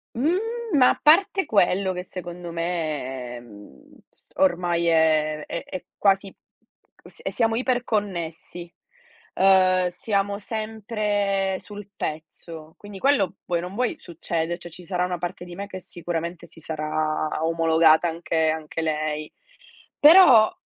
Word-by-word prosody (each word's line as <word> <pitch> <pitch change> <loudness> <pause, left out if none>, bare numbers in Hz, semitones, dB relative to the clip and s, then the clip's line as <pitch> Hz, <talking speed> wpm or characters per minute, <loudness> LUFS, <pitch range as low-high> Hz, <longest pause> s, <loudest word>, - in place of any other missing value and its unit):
Mhmm, 310 +10 +1 0.4
ma 255 -2 +6
a - - -2
parte 385 +5 +4
quello 190 - +2
che 180 - -5
secondo 175 -1 -8
me, 150 -8 -4
mhmm, 105 - -16 0.4
ormai 175 -2 +1
è 155 -2 +2
è 170 - -5
è 185 - -7
quasi 195 0 +2 0.8
e - - -14
s - - -10
e - - -3
siamo 225 -1 +1
iperconnessi, 200 -9 -3 0.6
ehm, 185 -1 +4
siamo 200 +2 -2
sempre 205 -2 -2
sul 205 -1 -10
pezzo, 160 +1 -7
quindi 205 -1 -10
quello 200 -7 +2
vuoi 175 - 0
o - - -8
non 180 +2 -7
vuoi 245 +2 -1
succede, 170 0 -4
cioè 175 -1 -11
ci 180 +2 -13
sarà 180 -1 -1
una 180 -1 -3
parte 175 +1 -5
di 175 -1 -10
me 200 +3 -6
che 190 -2 -8
sicuramente 170 0 -5
si 165 - -16
sarà 155 0 -2
omologata 165 0 +4
anche 165 -1 -1
anche 160 0 -4
lei. 155 -1 -2 0.7
Però 290 -9 +8
175 Hz, 135 wpm, -24 LUFS, 160-200 Hz, 0.8 s, Però